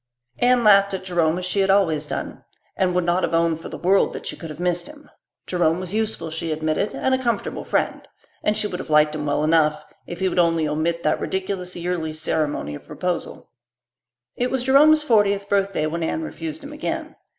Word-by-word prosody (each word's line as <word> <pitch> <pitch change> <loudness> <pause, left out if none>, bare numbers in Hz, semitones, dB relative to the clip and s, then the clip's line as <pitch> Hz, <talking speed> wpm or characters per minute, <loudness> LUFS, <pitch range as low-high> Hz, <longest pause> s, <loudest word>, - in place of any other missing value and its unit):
Anne 245 0 +4
laughed 200 -2 +5
at 190 - -6
Jerome 175 -3 +1
as 180 - -3
she 185 +2 -1
had 195 0 +2
always 165 -7 +2
done, - - -5 0.3
and 180 -1 +1
would 180 - +2
not 175 +2 +1
have 165 - 0
owned 165 -1 +1
for - - -8
the - - -7
world 190 +2 +2
that - - -7
she - - -4
could 165 - -9
have 155 - -9
missed 175 +3 0
him. 300 0 -14 0.3
Jerome 175 -2 +1
was 185 0 -5
useful, 215 -7 -2
she 160 0 -3
admitted, 155 +6 -1
and 265 - 0
a 260 - +1
comfortable 235 -5 -2
friend; - - -1 0.3
and 210 0 +1
she 215 - 0
would 180 -3 -4
have - - -7
liked 150 0 +4
him 150 -1 -4
well 145 +1 +1
enough 155 -1 +2 0.2
if 175 - -7
he 190 - +1
would 180 - 0
only 165 -2 +2
omit 165 +3 -1
that - - +1
ridiculous 185 -1 -3
yearly 175 -2 -3
ceremony 155 - -2
of 75 - -10
proposal. 180 -2 -4 0.8
It 250 +1 0
was 260 -1 -1
Jerome's 300 +4 +5
fortieth 205 -6 +2
birthday 195 -5 +1
when 165 +2 -3
Anne 320 - -1
refused 315 -1 -6
him 285 +1 -8
again. 295 - -4
180 Hz, 210 wpm, -22 LUFS, 160-205 Hz, 0.8 s, laughed